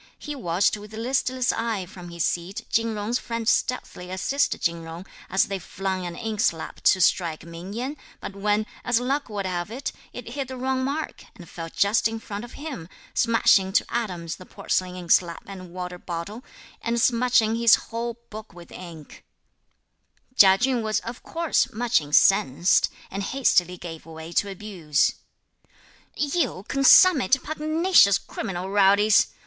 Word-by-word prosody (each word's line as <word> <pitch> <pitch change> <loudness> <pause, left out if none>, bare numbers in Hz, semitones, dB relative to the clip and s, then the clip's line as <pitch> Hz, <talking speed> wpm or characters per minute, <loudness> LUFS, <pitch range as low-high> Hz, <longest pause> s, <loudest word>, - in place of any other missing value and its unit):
He 295 - -6
watched 180 -5 +1
with 210 +1 -11
listless 255 +2 0
eye 225 -5 -2
from 180 -1 -11
his 170 -1 -2
seat 175 +3 -3
Chin 225 -1 +1
Jung's 215 +4 -1
friends 230 -1 -1
stealthily 180 -7 -2
assist 270 +10 0
Chin 170 -1 -1
Jung, 165 +2 -9 0.2
as 190 +1 +3
they 195 -1 -4
flung 185 0 -4
an 170 - -7
inkslab 220 -7 -2
to 190 - +4
strike 170 -3 +1
Ming 170 +3 -9
Yen, 255 +6 -4 0.2
but 200 - -7
when, 210 +1 0 0.2
as 235 -1 +2
luck 270 +2 -2
would 205 -2 -4
have 175 0 -3
it, 250 +5 -4 0.2
it - - -8
hit 275 -2 -4
the 260 0 -7
wrong 260 +1 -1
mark, 285 +4 -4
and 175 - -13
fell 165 0 -7
just 200 +7 +2
in 225 0 -5
front 205 0 -7
of 240 - -10
him, 275 - -7 0.2
smashing 210 -4 +3
to - - +3
atoms 180 -9 -3
the 185 - -12
porcelain 180 -1 -2
inkslab 175 -1 +2
and 185 -2 -9
water 180 0 -6
bottle, 180 +8 -6 0.4
and 235 0 -1
smudging 235 -2 +3
his 230 -1 +6
whole 235 0 -5
book 215 -3 -10
with 170 -1 -13
ink, 165 -5 -11 1.1
Chia 190 -4 +7
Chün 245 +2 +1
was, 215 -1 0
of 235 +1 -8
course, 330 -5 0
much 240 -3 +1
incensed, 150 +1 +3 0.2
and 195 - -4
hastily 185 -7 +1
gave 165 -2 -9
way 160 0 -9
to 200 +4 +1
abuse. 185 -7 0 1.0
"You 280 - -1
consummate 275 - +6
pugnacious 310 - +4
criminal 185 0 -5
rowdies! 205 +1 +5
205 Hz, 155 wpm, -24 LUFS, 180-240 Hz, 1.1 s, Chia